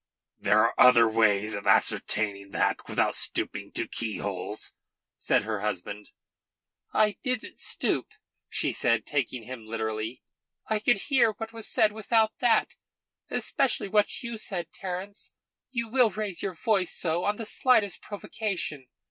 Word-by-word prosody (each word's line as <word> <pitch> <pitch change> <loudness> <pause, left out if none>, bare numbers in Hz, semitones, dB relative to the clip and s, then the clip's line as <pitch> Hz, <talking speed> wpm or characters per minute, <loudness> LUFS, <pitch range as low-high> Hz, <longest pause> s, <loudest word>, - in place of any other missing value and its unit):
"There - - +4
are - - +3
other 120 -2 +8
ways 110 -1 +2
of 100 -1 -5
ascertaining 100 -2 +2
that - - 0
without - - +1
stooping - - 0
to - - 0
keyholes," 100 -3 -4 0.5
said - - +2
her 110 -1 -3
husband. 105 0 -4 0.8
"I 210 -2 +2
didn't 255 -4 -3
stoop," - - 0 0.4
she - - 0
said, - - +1
taking 130 -4 -2
him 120 -1 -9
literally. 110 +1 -4 0.4
"I 215 -1 0
could 230 +1 +3
hear 240 -5 +4
what 225 +2 -7
was 225 -1 -5
said 215 -1 +3
without 220 +1 +2
that 235 -3 +3 0.6
especially 255 -6 0
what 210 +4 +1
you 235 -2 -4
said, 180 -5 -4
Terence. 190 +2 -6 0.4
You 240 -3 -2
will 245 0 +4
raise 205 -3 -4
your 190 -2 -3
voice 195 -1 0
so 170 +1 0
on 205 - +1
the 225 - -6
slightest 215 -4 +2
provocation." 195 - -4
185 Hz, 140 wpm, -27 LUFS, -, 0.8 s, other